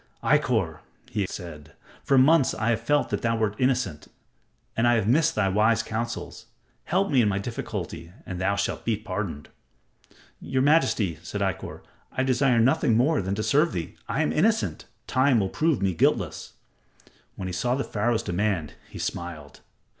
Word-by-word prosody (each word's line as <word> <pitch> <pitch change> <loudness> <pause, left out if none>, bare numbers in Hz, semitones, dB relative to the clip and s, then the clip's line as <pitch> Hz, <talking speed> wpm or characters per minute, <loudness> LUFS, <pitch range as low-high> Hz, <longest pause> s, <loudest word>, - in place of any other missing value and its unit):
"Ikkor," - - +1 0.3
he 105 -4 -1
said, 85 -7 -9 0.3
"for 135 - +3
months 140 +2 +5
have - - -7
I 115 +1 +2
felt 145 +7 0
that - - -1
thou 115 -1 +1
wert 110 -2 0
innocent, 125 - 0 0.7
and 115 +1 +2
I 120 - +4
have 110 -3 0
missed 150 +7 +3
thy 110 -3 +2
wise 110 +3 +2
counsels. 115 +1 -5 0.4
Help 190 +2 +1
me 130 -3 +5
in 110 - +3
my 95 - 0
difficulty 100 -5 -5
and 90 -1 -5
thou 100 +2 +1
shalt 100 0 -2
be 115 -2 0
pardoned." 95 -8 -5 0.9
"Your 130 -1 -1
majesty," 130 - +2
said - - -5
Ikkor, - - -3 0.3
"I 130 - -1
desire 130 -1 +2
nothing 115 -1 +3
more 145 +6 +2
than 95 +1 -2
to 110 - -2
serve 150 +8 +2
thee. 85 -2 -4
I - - +1
am - - 0
innocent. 220 +7 +1 0.2
Time 130 -2 +3
will 95 -2 0
prove 155 - 0
me 95 -2 +1
guiltless." - - 0 0.8
When 95 - -5
he - - -4
saw 120 +9 0
Pharaoh's 115 +2 -1
demand, 90 -4 -1 0.2
he - - -10
smiled. 80 -4 -5
115 Hz, 170 wpm, -26 LUFS, 95-130 Hz, 0.9 s, months